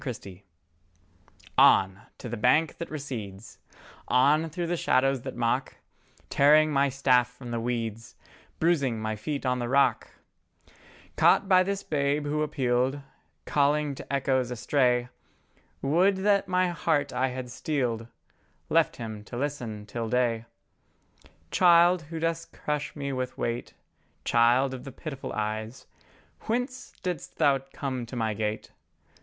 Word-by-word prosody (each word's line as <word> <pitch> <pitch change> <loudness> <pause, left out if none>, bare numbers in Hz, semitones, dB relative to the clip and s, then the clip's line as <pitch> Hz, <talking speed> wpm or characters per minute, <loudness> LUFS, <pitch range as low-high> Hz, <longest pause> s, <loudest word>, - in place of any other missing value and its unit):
CHRISTOPHER 100 -8 -7 1.2
ON 95 +1 +5 0.2
to - - -8
the 120 - -4
bank 130 +8 +2
that 170 - -5
recedes, 115 -9 -7 0.5
On 145 +6 +3
through 170 +3 -3
the 175 +1 -1
shadows 135 -4 +2
that - - -7
mock, 120 +2 -1 0.5
Tearing 155 +2 +5
my 140 -1 +3
staff 125 -2 +3
from 125 -1 -10
the 115 - -1
weeds, 115 -1 -4 0.4
Bruising 140 -9 +1
my 110 0 -2
feet 140 +7 -4
on 125 0 +1
the 120 -1 -3
rock, 140 +2 +2 1.1
Caught 200 - +4
by 185 -1 +6
this 200 +1 -2
Babe 145 0 0
who 150 +1 -1
appealed, 130 -2 0 0.5
Calling 145 0 +1
to 135 - -10
echoes 130 -2 +1
astray; 125 0 +1 0.7
Would 180 +8 +3
that 200 -2 +3
my 185 0 +2
heart 155 -5 0
I 125 +1 +1
had 125 -1 -6
steeled, 125 -4 -2 0.6
Left - - +3
Him 110 -3 -7
to 120 - -7
listen 120 -7 -4
till 115 +2 -4
day! 120 -2 +1 1.1
Child, 175 0 +5
who 165 -1 -5
dost 165 0 -2
crush 150 0 -3
me 140 -2 -4
with 130 -1 -4
weight, 120 +1 -3 0.5
Child 120 +3 +3
of 125 -1 -7
the 135 - -8
pitiful 135 0 -7
eyes, 110 +2 -4 0.6
Whence 250 +3 -2
didst 180 -5 -4
Thou 140 -1 +3
come 130 -4 -4
to 125 - -8
my 110 -2 -1
gate? 105 +1 -3
130 Hz, 140 wpm, -27 LUFS, 120-150 Hz, 1.2 s, by